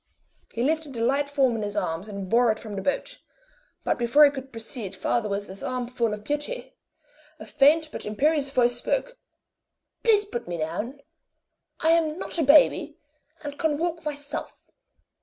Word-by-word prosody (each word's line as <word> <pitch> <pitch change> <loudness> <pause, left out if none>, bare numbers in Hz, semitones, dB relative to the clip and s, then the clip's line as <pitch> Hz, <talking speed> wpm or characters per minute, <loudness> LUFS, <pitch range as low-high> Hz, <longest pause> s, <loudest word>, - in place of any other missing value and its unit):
He 235 - -2
lifted 310 0 0
the 230 - -4
light 280 +3 +1
form 270 -4 +2
in - - -3
his 205 0 -4
arms 165 -1 -2
and 200 -2 -6
bore 235 +3 +4
it 215 - -2
from 215 -3 -8
the 195 - -3
boat; 280 - -2 0.6
but - - 0
before 240 +6 +6
he 285 - +4
could 270 -1 -8
proceed 225 -3 -6
farther 210 +3 0
with 200 0 -3
his 190 +1 -10
armful 245 -2 -2
of 210 0 -5
beauty, 295 - -3 0.6
a - - -10
faint 310 +3 +4
but - - -6
imperious 280 +6 +1
voice 245 -3 +2
spoke: - - -2 0.8
"Please 425 -3 +4
put 240 - -5
me 175 -1 -3
down. 210 - -4 0.8
I 320 - +4
am 325 -1 +2
not 350 - -1
a - - +3
baby, 300 +2 +5 0.5
and 290 0 -7
can 315 -3 +1
walk 335 +1 -2
myself." 290 0 -6
270 Hz, 175 wpm, -26 LUFS, 220-300 Hz, 0.8 s, before